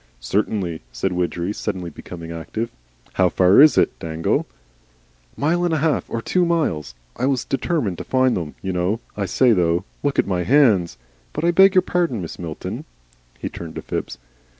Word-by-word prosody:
"Certainly," 90 Hz, -, -1 dB
said -, -, -2 dB
Widgery, 90 Hz, +1 st, -1 dB
suddenly 90 Hz, -4 st, -4 dB
becoming 85 Hz, +1 st, -9 dB
active. 95 Hz, +8 st, -4 dB, 0.4 s
"How 95 Hz, -1 st, +3 dB
far 95 Hz, +7 st, +5 dB
is 155 Hz, 0 st, +7 dB
it, -, -, +2 dB
Dangle?" 80 Hz, 0 st, -1 dB, 0.9 s
"Mile 170 Hz, +5 st, +1 dB
and 170 Hz, -2 st, +1 dB
a -, -, +1 dB
half 155 Hz, 0 st, 0 dB
or 115 Hz, 0 st, -3 dB
two 180 Hz, -, +2 dB
miles. 85 Hz, -, 0 dB, 0.2 s
I 130 Hz, -, 0 dB
was 135 Hz, -3 st, 0 dB
determined 135 Hz, -, -1 dB
to -, -, -4 dB
find 130 Hz, -1 st, +2 dB
them, 80 Hz, -4 st, -4 dB
you 95 Hz, -1 st, -2 dB
know. 90 Hz, +5 st, 0 dB, 0.2 s
I 100 Hz, -2 st, -2 dB
say 125 Hz, +6 st, +4 dB
though 85 Hz, -1 st, +1 dB, 0.2 s
Look 145 Hz, -1 st, -1 dB
at -, -, +3 dB
my 90 Hz, -2 st, -1 dB
hands! 110 Hz, -, +3 dB, 0.4 s
But -, -, -3 dB
I 170 Hz, -, +4 dB
beg 190 Hz, +2 st, +6 dB
your 185 Hz, -, +6 dB
pardon, 170 Hz, -, 0 dB
Mrs. 85 Hz, -, -8 dB
Milton." 80 Hz, -3 st, -6 dB, 0.5 s
He -, -, -4 dB
turned 85 Hz, -2 st, -8 dB
to -, -, -6 dB
Phipps. -, -, -4 dB
100 Hz, 180 wpm, -21 LUFS, 85-140 Hz, 0.9 s, is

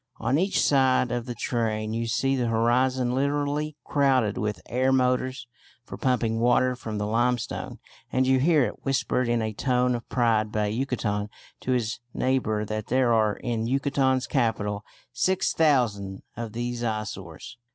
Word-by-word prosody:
On 140 Hz, -, +1 dB
each 190 Hz, +3 st, +1 dB
side 130 Hz, -3 st, +3 dB
of 120 Hz, 0 st, -3 dB
the 120 Hz, -, -4 dB
train 110 Hz, -2 st, -1 dB
you 115 Hz, +1 st, -2 dB
see 135 Hz, +4 st, +1 dB
the 125 Hz, -2 st, 0 dB
horizon 120 Hz, +2 st, +2 dB
literally 145 Hz, +2 st, -1 dB
crowded 130 Hz, -7 st, +2 dB
with 105 Hz, -3 st, -2 dB
air 130 Hz, +2 st, +1 dB
motors 130 Hz, 0 st, +1 dB, 0.4 s
for -, -, -8 dB
pumping 120 Hz, -3 st, 0 dB
water 125 Hz, +2 st, +3 dB
from 110 Hz, -3 st, -6 dB
the 105 Hz, -, -1 dB
limestone, 120 Hz, +2 st, -1 dB, 0.3 s
and 130 Hz, 0 st, +2 dB
you 130 Hz, 0 st, +3 dB
hear 150 Hz, 0 st, +4 dB
it 105 Hz, -, -7 dB
whispered 130 Hz, -2 st, 0 dB
in 120 Hz, -1 st, +1 dB
a 110 Hz, 0 st, -3 dB
tone 125 Hz, +2 st, +1 dB
of 120 Hz, -1 st, -5 dB
pride 110 Hz, -4 st, +1 dB
by 105 Hz, -1 st, 0 dB
a 105 Hz, -, -2 dB
Yucatecan 110 Hz, -5 st, -2 dB, 0.3 s
to 130 Hz, -, -1 dB
his 120 Hz, -2 st, -1 dB, 0.2 s
neighbour 115 Hz, -5 st, 0 dB
that 110 Hz, 0 st, -4 dB
there 125 Hz, -1 st, +2 dB
are 110 Hz, -2 st, +2 dB
in 115 Hz, -3 st, -2 dB
Yucatan's 135 Hz, 0 st, +1 dB
capital 105 Hz, -6 st, -1 dB, 0.3 s
6,000 125 Hz, -, +1 dB
of 115 Hz, -2 st, -6 dB
these 120 Hz, +1 st, -3 dB
eyesores. 110 Hz, +2 st, -5 dB
120 Hz, 160 wpm, -26 LUFS, 110-130 Hz, 0.4 s, hear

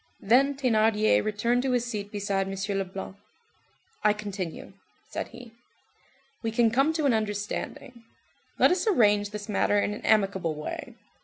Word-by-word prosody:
Then 270 Hz, +7 st, +3 dB
Thénardier 220 Hz, -4 st, +3 dB
returned 225 Hz, +4 st, +1 dB
to 260 Hz, -1 st, 0 dB
his 245 Hz, -1 st, +1 dB
seat 210 Hz, -4 st, -5 dB
beside 200 Hz, -2 st, -1 dB
M. 195 Hz, -, -4 dB, 0.2 s
Leblanc. 195 Hz, 0 st, -5 dB, 0.9 s
"I 210 Hz, -, +5 dB
continue," 200 Hz, -5 st, -6 dB, 0.4 s
said -, -, -3 dB
he. 240 Hz, -2 st, -13 dB, 0.9 s
"We 225 Hz, -, -1 dB
can 225 Hz, 0 st, +2 dB
come 270 Hz, +6 st, +3 dB
to 315 Hz, -2 st, -1 dB
an 270 Hz, -, +4 dB
understanding. 215 Hz, +3 st, -4 dB, 0.5 s
Let -, -, +5 dB
us 365 Hz, +5 st, 0 dB
arrange 210 Hz, -, +3 dB
this 210 Hz, 0 st, -7 dB
matter 205 Hz, -1 st, +2 dB
in 205 Hz, -, 0 dB
an 210 Hz, -, -7 dB
amicable 195 Hz, -6 st, +1 dB
way. 150 Hz, 0 st, -6 dB
210 Hz, 150 wpm, -27 LUFS, 200-240 Hz, 0.9 s, I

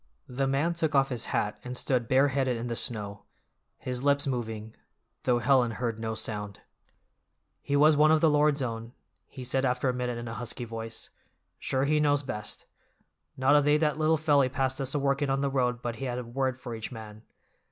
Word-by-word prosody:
The 135 Hz, +2 st, -1 dB
man 140 Hz, +6 st, +1 dB
took 160 Hz, -3 st, -1 dB
off 135 Hz, 0 st, +4 dB
his 120 Hz, -3 st, -2 dB
hat 105 Hz, 0 st, -1 dB
and 125 Hz, 0 st, -5 dB
stood 125 Hz, -3 st, 0 dB
bare 135 Hz, +3 st, +4 dB
headed 130 Hz, -2 st, 0 dB
in 115 Hz, -, -4 dB
the 120 Hz, -1 st, -3 dB
snow, 105 Hz, -4 st, -3 dB, 0.6 s
his 125 Hz, 0 st, -4 dB
lips 140 Hz, 0 st, +3 dB
moving, 110 Hz, -4 st, -4 dB, 0.5 s
though 125 Hz, -2 st, +3 dB
Helen 125 Hz, -1 st, +3 dB
heard 115 Hz, -1 st, -3 dB
no 110 Hz, 0 st, -3 dB
sound. 105 Hz, -2 st, -4 dB, 1.0 s
"He 140 Hz, -, -1 dB
was 150 Hz, +2 st, +6 dB
one 150 Hz, +1 st, +5 dB
of 160 Hz, 0 st, +5 dB
the 160 Hz, -, +4 dB
Lord's 150 Hz, -2 st, +3 dB
own," 115 Hz, 0 st, -5 dB, 0.3 s
he 130 Hz, -, -9 dB
said 130 Hz, +2 st, 0 dB
after 125 Hz, 0 st, +1 dB
a -, -, 0 dB
minute 125 Hz, -1 st, -2 dB
in 120 Hz, 0 st, -6 dB
a 115 Hz, -, -5 dB
husky 120 Hz, +1 st, -4 dB
voice. 115 Hz, 0 st, -6 dB, 0.5 s
"Sure 130 Hz, 0 st, 0 dB
He 150 Hz, +1 st, +2 dB
knows 145 Hz, -1 st, +2 dB
best. 105 Hz, -6 st, -5 dB, 0.7 s
Not 130 Hz, +2 st, +4 dB
a 145 Hz, -, +6 dB
day 150 Hz, +1 st, +4 dB
that 150 Hz, -1 st, 0 dB
little 155 Hz, +1 st, +3 dB
felly 145 Hz, -4 st, +3 dB
passed 130 Hz, 0 st, -1 dB
us 135 Hz, +1 st, -2 dB
a -, -, +3 dB
workin' 140 Hz, 0 st, +1 dB
on 135 Hz, 0 st, +1 dB
the 140 Hz, -1 st, 0 dB
road 125 Hz, -2 st, 0 dB
but 120 Hz, -1 st, -3 dB
he 135 Hz, -, -4 dB
had 125 Hz, -1 st, -2 dB
a 125 Hz, -, -3 dB
word 130 Hz, +2 st, -2 dB
for 120 Hz, -2 st, -7 dB
each 110 Hz, +2 st, -6 dB
man! 110 Hz, -2 st, -9 dB
130 Hz, 210 wpm, -28 LUFS, 115-140 Hz, 1.0 s, was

